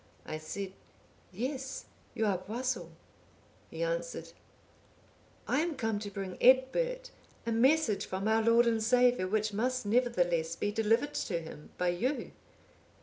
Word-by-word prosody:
I 155 - -5
said, 190 +5 -5 0.6
'Yes, 265 +6 -4 0.3
you 220 - +1
are 195 -4 +1
Boisil.' 225 -2 -3 0.8
He 165 +1 -4
answered, 165 0 -3 1.2
'I 265 - +2
am 330 0 0
come 225 -5 -1
to 205 -1 -5
bring 195 -2 -6
Egbert - - +3 0.3
a 230 - -1
message 250 -1 +3
from 190 +2 -2
our 220 0 +3
Lord 230 +1 +5
and 225 -1 +2
Saviour, 245 -3 +3
which 215 +1 0
must 255 +3 -1
nevertheless 175 -8 +1
be 205 - -1
delivered 225 +7 +1
to 180 - -1
him 160 -2 -10
by 180 0 +1
you. 245 +12 -1
220 Hz, 140 wpm, -31 LUFS, 185-255 Hz, 1.2 s, Lord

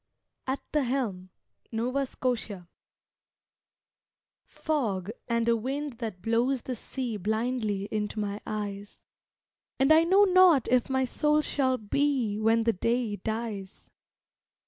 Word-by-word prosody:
AT 265 +1 -2
THE 300 -2 +2
HELM 220 -8 -2 0.4
(Nova 250 +4 -1
Scotia) 220 -9 -3 1.8
Fog, 215 - -2 0.2
and 235 -1 0
a 235 - +4
wind 265 +2 -4
that 220 -7 -5
blows 240 +3 +1
the 255 - -3
sea 245 -1 -4
Blindly 215 0 -1
into 215 0 -2
my 205 0 -3
eyes. 205 -1 -5 0.8
And 270 +3 +3
I 320 +1 +7
know 380 +4 +5
not 370 - +5
if 250 0 +2
my 265 0 +1
soul 300 +4 +2
shall 260 -3 +1
be 235 -1 0
When 225 +1 +3
the 230 0 +2
day 230 +1 -1
dies. 220 -2 -5
235 Hz, 125 wpm, -28 LUFS, 210-270 Hz, 1.8 s, I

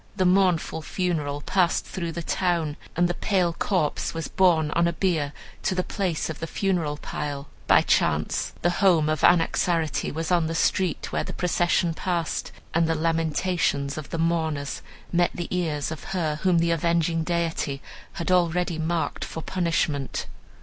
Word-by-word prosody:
The 185 - +1
mournful 180 -3 +2
funeral 155 -4 -2
passed 180 +2 +1
through 170 -3 -4
the 170 - -4
town, 170 -4 0 0.2
and 175 +1 +3
the 175 - -1
pale 180 -2 +1
corpse 165 -3 -1
was 165 - -3
borne 165 -5 +3
on 170 +2 +3
a 170 - 0
bier 165 -6 0 0.3
to 185 - 0
the 185 - +1
place 180 -6 -2
of 160 - -6
the 165 - -4
funeral 170 -6 -1
pile. 145 -1 -5 0.2
By - - +6
chance 75 -1 +1
the 175 - +3
home 170 -6 +4
of 155 -2 0
Anaxarete 165 -2 +2
was 160 +3 -3
on 170 -3 +3
the 165 - -3
street 185 +1 0
where - - 0
the - - -6
procession 175 -1 +1
passed, 170 -1 -2 0.2
and 165 0 +3
the 165 - +1
lamentations 160 -2 0
of 155 -2 -7
the - - -3
mourners 160 -3 -1 0.3
met 175 0 +4
the 175 +1 -3
ears 155 -4 -1
of 160 - -7
her 155 -4 0
whom 185 -2 +3
the 170 0 +2
avenging 165 0 +1
deity 165 -4 -1 0.3
had 170 +2 -2
already 175 -1 +2
marked 165 +1 -1
for 160 - -6
punishment. 165 -6 -1
165 Hz, 165 wpm, -25 LUFS, 155-175 Hz, 0.3 s, By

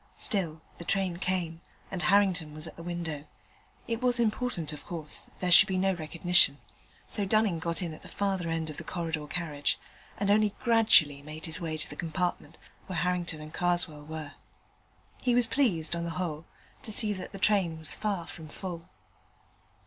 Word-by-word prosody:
Still, 165 -8 +2 0.2
the - - -6
train 185 -1 +1
came, 175 -3 -1 0.3
and 185 - -3
Harrington 180 -6 +3
was 155 +1 -2
at - - -7
the - - -9
window. 165 -4 -4 0.6
It 230 0 -2
was 245 -1 +3
important, 215 -8 0
of 150 - -9
course, 160 -3 -4
that - - -13
there 180 -1 0
should 175 +3 +9
be 190 -2 0
no 190 +1 +3
recognition: 170 -2 +3 0.5
so 205 - -1
Dunning 205 -3 +2
got 170 +2 -1
in 165 -2 -3
at - - -11
the - - -11
farther 190 -4 -1
end 165 -1 -1
of 150 - -10
the - - -6
corridor 165 -4 -3
carriage, 150 -3 -1 0.4
and 200 0 +1
only 210 0 +3
gradually 215 - +5
made 155 +2 -7
his 165 +2 0
way 160 -2 -2
to 150 - -3
the 145 - -8
compartment 165 -1 -2 0.3
where 185 -3 -3
Harrington 175 -3 0
and 155 +1 -9
Karswell 175 -4 0
were. 155 -1 -6 0.9
He 245 -1 +2
was 245 -1 +5
pleased, 185 - +1
on 170 - -2
the 170 - -2
whole, 165 -3 -3 0.4
to 220 - -4
see 210 0 +1
that 185 - -7
the 195 - -7
train 190 -5 +3
was 160 -1 -1
far 200 -5 -2
from 160 -2 -9
full. 170 +1 -7
175 Hz, 185 wpm, -30 LUFS, 160-195 Hz, 0.9 s, should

